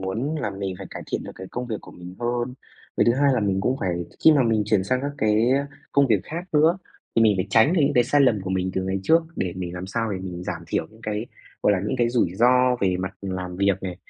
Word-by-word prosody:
muốn 110 +11 -2
là 105 - -2
mình 95 -1 -4
phải 95 - -7
cải - - -7
thiện - - -1
được - - -7
cái 95 - -9
công 125 +1 -4
việc 110 -3 -3
của - - -13
mình 90 +1 -10
hơn. 120 +1 -1 0.4
Cái - - +4
thứ 120 - +4
hai 140 +1 +3
là 125 - +1
mình 100 -2 0
cũng 125 +6 0
phải 85 -2 -1 0.2
khi 160 - +9
mà 145 -3 +4
mình 110 -3 +2
chuyển 105 -3 +2
sang 130 +5 0
các 140 - -1
cái, 110 +3 +3
ơ, 140 +2 +2 0.3
công 140 -1 +4
việc 110 -5 +2
khác 170 +3 -5
nữa, 160 +4 +4 0.4
thì 115 - +5
mình 110 -2 +5
phải 90 - 0
tránh 115 +8 +5
được 180 - +2
những 140 - +3
cái 120 - +4
sai 145 - +2
lầm 120 -7 +4
của 95 0 -5
mình 95 0 0
từ 95 - 0
ngày 95 +1 -1
trước, 165 +11 +4
để 90 -2 -2
mình 90 -1 -5
làm 90 +1 -5
sao 115 +1 -2
để 95 - -3
mình 90 -2 -6
giảm 85 -2 -5
thiểu 80 - -1
những 110 - -19
cái, 105 +1 -3 0.4
gọi 105 - +4
là, 95 - +1
những 105 - -1
cái 120 -1 +3
rủi 115 -8 +1
ro 125 +3 +4
về 95 -2 +2
mặt 95 0 -4
làm 90 -2 -4
việc 100 -1 +1
này. 90 -2 -4
105 Hz, 285 wpm, -24 LUFS, 95-125 Hz, 0.4 s, khi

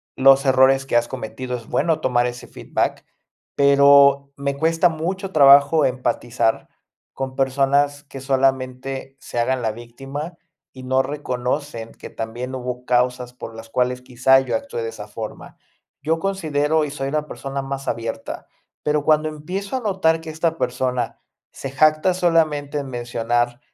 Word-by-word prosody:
los 135 +1 +5
errores 135 +1 +4
que 135 - -2
has 120 0 +3
cometido, 125 +3 -5
es 115 - -12
bueno 155 +5 0
tomar 120 -3 +2
ese 120 0 -7
feedback. - - -2 0.5
Pero 140 0 +5
me 140 0 -2
cuesta 165 +4 +3
mucho 185 +5 -4
trabajo 140 +1 +6
empatizar 120 -2 -1 0.4
con 130 -1 -5
personas 140 +2 +1
que 135 -2 -10
solamente 135 0 -1
se 120 - -5
hagan 125 +1 0
la 110 - +1
víctima 135 +8 -8 0.4
y 130 -1 -11
no 130 +1 +2
reconocen 130 -3 -4
que - - -11
también 120 +3 -5
hubo 125 -1 -5
causas 125 0 0
por 115 -2 -9
las 115 0 -10
cuales 125 +1 -1
quizá 130 +2 +4
yo 125 -3 -2
actué 115 +1 -4
de 115 - -3
esa 105 -1 -9
forma. 110 +1 -8 0.5
Yo 160 +2 +1
considero, 160 -5 0
y 150 - -2
soy 135 -1 -4
una 150 0 -2
persona 135 0 -5
más 135 0 -5
abierta, 115 -1 -4 0.3
pero 150 -1 0
cuando 155 +1 +3
empiezo 180 - -5
a - - -5
notar 185 -6 +1
que 160 -1 -8
esta 165 +1 -1
persona 125 -3 -2 0.3
se 135 - -7
jacta 155 +6 +3
solamente 155 -5 +1
en 140 - -5
mencionar, 120 0 -1
135 Hz, 155 wpm, -21 LUFS, 125-150 Hz, 0.5 s, trabajo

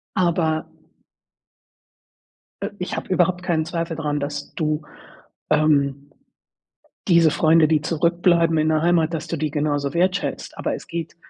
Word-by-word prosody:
Aber 170 -4 +1 2.0
äh, - - -2
ich 180 - -4
habe - - -6
überhaupt 180 0 +1
keinen 160 -3 0
Zweifel 165 0 -3
dran, 150 -2 -2
dass 145 0 -5
du, 155 -1 -1 0.7
ähm, 145 -2 +2 1.0
diese 170 -3 +5
Freunde, 160 0 +4
die 155 -1 +3
zurückbleiben 170 +1 +2
in 155 0 +2
der 155 -1 +2
Heimat, 170 -1 +2
dass 155 -2 -4
du 165 - -3
die 155 0 -1
genauso 145 -2 -1
wertschätzt. 185 +3 -1
Aber - - -2
es - - -11
geht 165 -1 -5
160 Hz, 140 wpm, -22 LUFS, 150-170 Hz, 2.0 s, diese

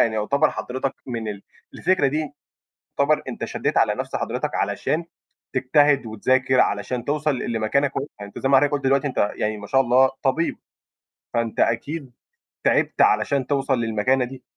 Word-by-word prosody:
يعني 115 - +3
يعتبر 140 +8 +2
حضرتك 130 +2 -3
من 115 -3 -4
ال 100 -1 -6 0.3
الفكرة 185 -6 +2
دي 150 +2 -2 0.7
يعتبر - - +3
أنت - - -4
شدّيت - - -1
على - - +3
نَفْس - - -4
حضرتك، - - -3
علشان 165 +2 -1 0.5
تجتهد 140 0 +3
وتذاكر 130 +4 +2
علشان 125 -2 0
توصل 150 -1 0
ل 120 - -3
لمكانة 115 +6 +1
كويسة، 140 +1 -5
أنت 100 0 -8
زي 135 - -1
ما 135 - +6
حضرتك 145 +2 +3
قُلت 145 -2 -1
دلوقتي 135 +1 +2
أنت 115 -6 0
يعني 105 0 -1
ما 105 0 -9
شاء 135 +5 +3
الله 130 +1 +4
طبيب، 150 +5 0 0.8
فأنت 115 -1 -1
أكيد 140 +4 -1 0.5
تِعِبت - - +1
علشان 140 - +2
توصل 135 -1 0
للمكانة 115 +3 +1
دي. 130 0 -9
130 Hz, 165 wpm, -23 LUFS, 115-140 Hz, 0.8 s, ما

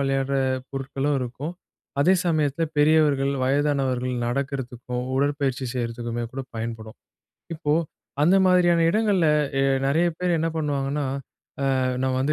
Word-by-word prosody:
விளையாடுற 135 0 0 0.3
பொருட்களும் 135 +1 -2
இருக்கும். 125 +6 -5 0.5
அதே 185 +7 +5
சமயத்துல 155 -1 +1
பெரியவர்கள், 145 -2 +3
வயதானவர்கள் 135 -2 +1
நடக்கிறதுக்கும், 125 -1 -3
உடற்பயிற்சி 140 -2 0
செய்றதுக்குமே 120 -1 -3
கூட 135 - -4 0.2
பயன்படும். 110 -1 -6 0.6
இப்போ, 155 -2 -1 0.5
அந்த 175 +6 +5
மாதிரியான 175 -2 +4
இடங்கள்ல, 205 -4 +2 0.3
எ - - +3 0.2
நெறைய 160 +5 +2
பேர் 180 -1 +1
என்ன 165 +1 0
பண்ணுவாங்கன்னா,"அ 140 -2 -3 0.4
நான் 130 -1 0
வந்து 140 +3 +1
140 Hz, 110 wpm, -24 LUFS, 130-155 Hz, 0.6 s, அதே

